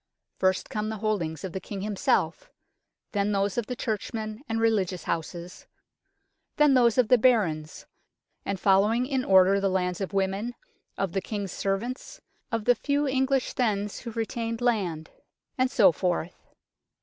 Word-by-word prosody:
First 185 0 +1
come 215 0 -2
the 220 - -4
holdings 195 -8 -2
of 190 - -5
the 190 - -3
King 195 +1 -7
himself, 205 -1 0 0.6
then 205 0 0
those 200 0 0
of 240 -3 -2
the 250 - -3
Churchmen 215 0 -4
and 225 0 0
religious 200 -6 +1
houses, 170 +2 -5 0.9
then 295 -2 +5
those 240 -3 +4
of 250 -3 +4
the 250 +1 +5
Barons, 185 -11 +1 0.6
and 200 -1 -3
following 210 +6 +3
in 260 -1 -1
order 190 -1 +5
the 195 0 +1
lands 180 0 -1
of 195 - -3
women, 195 +4 -1 0.4
of 195 -3 -1
the 195 - -1
King's 200 -3 -4
Serjeants, 240 - -3 0.3
of 225 -2 -2
the 245 - +6
few 285 +4 0
English 265 0 +1
thegns 210 -5 -1
who 235 - -7
retained 230 0 -3
land, 190 -10 -1 0.4
and 255 0 +2
so 215 -9 +5
forth. 175 0 -3
210 Hz, 155 wpm, -27 LUFS, 190-240 Hz, 0.9 s, the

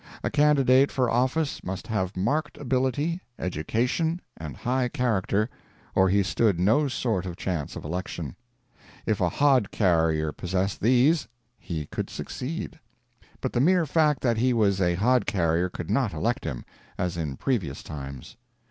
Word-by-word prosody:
A - - -1
candidate 140 -2 +4
for 125 -3 +1
office 130 +5 0
must 95 +1 -5
have 95 -4 -2
marked 150 +10 0
ability, 140 +6 0 0.2
education, 125 - -1 0.2
and 75 -5 -7
high 125 +1 0
character, 110 -4 +1 0.5
or 95 0 +4
he 100 +1 +3
stood 95 +2 +1
no 110 +11 +3
sort 110 -8 -1
of 85 - -5
chance 85 -6 -3
of - - -7
election. 85 -1 -4 0.7
If 110 -3 0
a 90 - +3
hod 135 - +3
carrier 80 -5 +2
possessed 95 +4 -2
these, 130 +8 +4 0.3
he 80 -4 -4
could - - -4
succeed; 160 +5 -5 0.6
but 130 - -2
the 120 - +2
mere 175 +3 +4
fact 150 -2 +2
that 120 -3 +2
he 125 +2 +2
was 100 -4 +2
a 90 -1 +2
hod 125 +7 +2
carrier 85 -1 +1
could 90 0 -6
not 120 -2 +1
elect 120 +4 -1
him, 70 -7 -4 0.3
as 90 -1 -1
in 75 -6 -3
previous 120 -10 -2
times. 70 - -8
110 Hz, 155 wpm, -26 LUFS, 90-130 Hz, 0.7 s, candidate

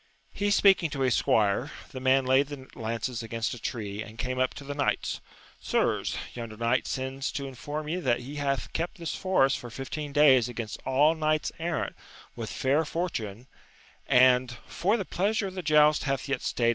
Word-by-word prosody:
He 205 0 0
speaking 195 -4 +5
to 140 -2 -4
his 130 -2 +3
squire, 105 +6 +2 0.2
the 130 - -6
man 130 +1 +3
laid 130 +2 +4
the 140 -3 -9
lances 115 +1 -3
against 115 0 -3
a 125 - -8
tree, 105 -3 -4
and 110 0 -9
came 130 +2 -2
up 130 0 +1
to - - -8
the 145 +1 -5
knights. 140 -1 -1 0.2
— - - -25
Sirs, - - 0 0.2
yonder 115 -3 -7
knight 115 +1 +1
sends 130 +1 -3
to 140 - -3
inform 145 +4 -5
ye 165 +4 -1
that 125 -8 +1
he 140 +4 -7
hath 135 -8 -2
kept 175 +5 -2
this 170 -2 -4
forest 185 -8 +2
for 120 - -8
fifteen 135 +4 -5
days 135 -5 +5
against 115 -3 -6
all 145 +4 +4
knights 155 -1 0
errant 165 0 -2 0.4
with 115 -3 -5
fair 140 +4 +1
for 170 +3 -2
tune, 110 +2 -5 0.6
and 125 -1 +4
for 200 +6 0
the 200 - -3
pleasure 205 +5 0
of 190 - -5
the 185 - -4
joust 150 -2 +4
hath 135 0 -1
yet 135 -2 0
&t&^e>d. 115 -1 +1
135 Hz, 195 wpm, -28 LUFS, 120-155 Hz, 0.6 s, speaking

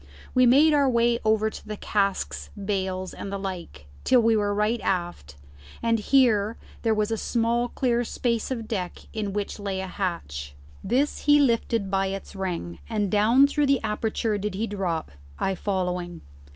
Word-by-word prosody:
We 255 -1 +5
made 295 +6 +6
our 285 -2 +4
way 235 -1 +2
over 220 0 +2
the 210 0 -6
casks, 75 - -1
bales, 190 -2 -2
and 195 - -6
the 200 - -2
like, 180 - -6 0.2
till 255 - +5
we 225 -1 +4
were 205 -1 +1
right 210 +3 0
aft, 175 - -2 0.5
and 230 -1 +2
here 225 -3 +3 0.2
there 225 -2 +2
was 215 +1 0
a 225 - 0
small 235 +2 0
clear 240 -1 0
space 235 -1 -1
of 230 -4 -4
deck 185 -5 -4
in 210 -2 -2
which 205 +1 -3
lay 200 -2 -3
a 190 - -3
hatch. 70 - -4 0.3
This 280 +4 0
he 295 0 +6
lifted 230 -6 +1
by 195 0 +1
its 195 +1 -6
ring, 175 - -4
and 210 -4 -1
down 225 +6 +5
through 285 0 +1
the 275 -2 +3
aperture 215 0 -1
did 205 -1 -3
he 215 +4 -1
drop, 185 - -3 0.3
I 195 - 0
following. 180 -3 -2
210 Hz, 170 wpm, -25 LUFS, 190-235 Hz, 0.5 s, made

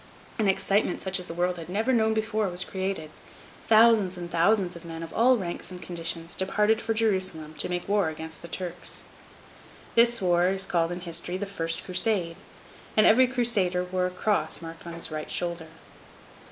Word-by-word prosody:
An 215 - +2
excitement 195 0 +2
such 190 0 -1
as 180 - -8
the - - -6
world 180 +1 0
had 165 0 -8
never 220 +7 +1
known 220 -2 +3
before 220 -2 0
was 180 0 -1
created. 190 -5 -4 0.6
Thousands 220 -4 +5
and 175 -1 -6
thousands 180 +2 +2
of 170 - -10
men 165 -1 -7
of 165 - -8
all 250 +3 +5
ranks 175 -5 -5
and 180 -1 -8
conditions 165 -1 -5
departed 210 +3 +1
for 225 0 -1
Jerusalem 185 -8 -1
to - - -1
make 175 0 -3
war 200 -4 +2
against 160 0 -8
the 170 - -9
Turks. 175 +1 -6 0.9
The 235 0 +6
war 175 -1 +3
is 190 0 -1
called 170 -2 +1
in 175 +1 -5
history 175 +1 -4
the 205 - -3
first 165 -4 -2
Crusade, 185 -3 0 0.6
and 215 - +6
every 255 +4 +6
Crusader 220 -8 +1
wore 180 0 -1
a - - -3
cross 205 +3 0
marked 165 0 -9
on 170 - -6
his 170 -1 -2
right 155 0 -5
shoulder. 170 -2 -3
180 Hz, 185 wpm, -27 LUFS, 170-210 Hz, 0.9 s, The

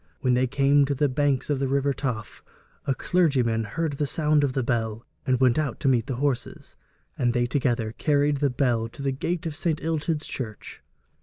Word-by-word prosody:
When 125 -2 +2
they 125 +1 +2
came 140 +2 +3
to 140 0 -1
the 145 +2 +2
banks 140 0 0
of 140 - 0
the 135 - 0
river 140 +1 +1
Taff, 120 -5 -4 0.4
a 135 - +2
clergyman 130 -12 +1
heard 160 +9 -2
the 145 +1 -1
sound 150 0 +2
of 135 -2 +1
the 130 - 0
bell, 115 -2 -2 0.2
and 130 -1 +2
went 130 +2 +4
out 150 -3 -2
to - - 0
meet 120 -4 +2
the 130 - -2
horse, 135 -1 -3 0.4
and 120 -2 +2
they 120 -1 +2
together 120 -3 0
carried 145 -1 +2
the 140 0 +1
bell 120 -3 0
to 140 +4 -9
the 135 - +1
gate 165 +6 -3
of 160 -2 -3
St. 155 0 -1
Illtyd's 160 -1 -1
church. 110 -6 -7
135 Hz, 205 wpm, -25 LUFS, 125-145 Hz, 0.4 s, went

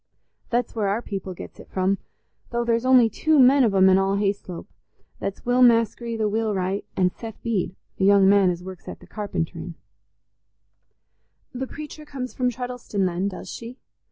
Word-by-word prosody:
That's 240 +1 0
where 215 -3 -1
our 210 +5 -1
people 190 -2 -5
gets - - -10
it - - -13
from, 190 +1 0 0.5
though 235 0 -1
there's 235 +1 +1
only 255 -3 +7
two 310 +8 +1
men 270 +1 +6
of 215 -4 +2
'em 190 0 +6
in 190 0 +5
all 195 +1 +1
Hayslope: 195 -3 -2 0.5
that's 195 - -5
Will 245 +1 +2
Maskery, 230 -1 +3
the 215 -1 +1
wheelwright, 205 -3 -1
and 180 -1 +2
Seth 225 -2 -9
Bede, 205 -5 -1 0.2
a - - 0
young 200 0 +6
man 195 -1 +5
as 175 0 -3
works 185 -1 -10
at - - -7
the - - -15
carpenterin'." 170 -5 -4 1.8
"The 260 +1 -4
preacher 305 +2 -9
comes 265 -4 -6
from 250 -1 +1
Treddleston, 245 -5 -3
then, 180 +2 -1
does 195 - -7
she?" 235 +2 -8
210 Hz, 175 wpm, -24 LUFS, 190-245 Hz, 1.8 s, only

